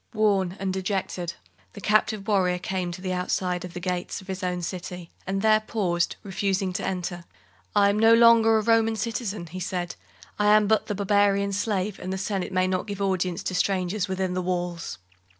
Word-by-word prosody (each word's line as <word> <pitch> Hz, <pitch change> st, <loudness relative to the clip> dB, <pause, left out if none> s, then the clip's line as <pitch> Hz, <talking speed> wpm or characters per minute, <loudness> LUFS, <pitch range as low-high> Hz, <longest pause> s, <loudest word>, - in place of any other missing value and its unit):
Worn 195 Hz, -3 st, +2 dB
and 190 Hz, -1 st, -1 dB
dejected, 190 Hz, -2 st, -2 dB, 0.4 s
the -, -, -9 dB
captive 215 Hz, -1 st, +1 dB
warrior 185 Hz, -4 st, +2 dB
came 180 Hz, -1 st, -3 dB
to 180 Hz, +2 st, -8 dB
the 185 Hz, -1 st, -1 dB
outside 180 Hz, 0 st, -1 dB
of 180 Hz, -1 st, -8 dB
the -, -, -3 dB
gates 180 Hz, 0 st, -3 dB
of 190 Hz, -, -13 dB
his 190 Hz, 0 st, -5 dB
own 180 Hz, -1 st, -2 dB
city 180 Hz, -1 st, -6 dB, 0.2 s
and 195 Hz, +1 st, -1 dB
there 215 Hz, 0 st, +5 dB
paused, 185 Hz, -6 st, -1 dB
refusing 195 Hz, -1 st, -1 dB
to -, -, -3 dB
enter. 180 Hz, -2 st, -3 dB, 0.5 s
"I 200 Hz, -, +6 dB
am 210 Hz, -, -1 dB
no 225 Hz, +1 st, +7 dB
longer 230 Hz, -1 st, +6 dB
a 215 Hz, -, 0 dB
Roman 225 Hz, 0 st, +3 dB
citizen," 215 Hz, -3 st, -3 dB
he 175 Hz, +3 st, -7 dB
said; 180 Hz, -1 st, -3 dB, 0.5 s
"I 210 Hz, -, +3 dB
am 215 Hz, -1 st, +4 dB
but 220 Hz, +1 st, +2 dB
the 210 Hz, -, -2 dB
barbarian's 200 Hz, 0 st, +2 dB
slave, 205 Hz, -2 st, -1 dB
and 185 Hz, -, -5 dB
the 190 Hz, -, -2 dB
Senate 195 Hz, -1 st, -2 dB
may 185 Hz, 0 st, +2 dB
not 185 Hz, +2 st, -1 dB
give 200 Hz, -1 st, -5 dB
audience 185 Hz, -3 st, -1 dB
to -, -, -3 dB
strangers 185 Hz, +1 st, 0 dB
within 190 Hz, -1 st, -1 dB
the 185 Hz, -, -1 dB
walls." 175 Hz, -, -3 dB
190 Hz, 195 wpm, -26 LUFS, 180-205 Hz, 0.5 s, no